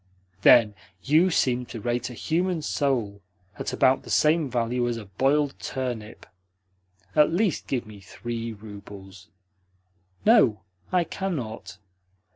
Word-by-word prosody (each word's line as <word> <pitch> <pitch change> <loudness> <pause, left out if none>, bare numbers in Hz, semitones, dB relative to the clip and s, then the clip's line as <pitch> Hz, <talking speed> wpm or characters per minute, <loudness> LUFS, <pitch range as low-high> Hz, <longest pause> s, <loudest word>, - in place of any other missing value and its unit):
"Then 110 -1 +6 0.3
you 160 +6 +4
seem 125 -7 +1
to 115 - -7
rate 120 +3 -2
a 125 - -9
human 170 +4 -1
soul 120 -10 -1 0.4
at - - -3
about 130 +1 +3
the - - -13
same 155 -1 +3
value 120 0 0
as 120 -1 -2
a 110 - -8
boiled 135 +8 +1
turnip. 120 -5 -5 0.9
At 150 +1 +5
least 180 -1 0
give 125 -3 -2
me 105 -1 -12
THREE 115 +3 -6
roubles." 100 -2 -12 1.0
"No, 135 - +5 0.3
I 180 -1 +3
cannot." 155 - -5
125 Hz, 125 wpm, -25 LUFS, 110-150 Hz, 1.0 s, Then